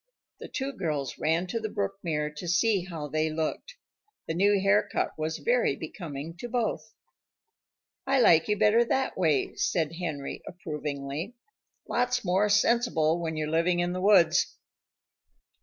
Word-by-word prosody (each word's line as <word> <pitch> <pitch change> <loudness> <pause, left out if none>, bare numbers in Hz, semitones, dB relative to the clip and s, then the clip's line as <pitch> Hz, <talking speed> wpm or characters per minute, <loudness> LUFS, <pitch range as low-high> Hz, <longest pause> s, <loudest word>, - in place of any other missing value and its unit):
The - - -8
two 275 +1 -4
girls 150 - -3
ran 165 +3 +1
to 205 +6 -3
the 220 -1 -4
brook 100 - -3
mirror 150 -3 -2
to 150 +4 -8
see 185 +2 +2
how 165 -5 -6
they 155 +2 0
looked. 160 - -3 0.5
The 160 - -1
new 200 +4 +3
haircut 195 +2 +1
was 155 +1 -3
very - - +1
becoming 160 -2 -7
to 240 +7 -7
both. 235 -2 -2 1.1
"I 270 0 +3
like 165 -9 +5
you 210 - +1
better 220 +4 +4
that 265 +3 -1
way," 155 -7 +1
said 165 -1 0
Henry 155 -6 -4
approvingly. 150 - -5 0.5
"Lots 250 -1 0
more 190 +3 +2
sensible 205 -7 +2
when 160 -1 -3
you're 155 0 -2
living 170 +2 +2
in 175 0 0
the 185 - -3
woods." 185 -5 +4
175 Hz, 150 wpm, -28 LUFS, 155-210 Hz, 1.1 s, like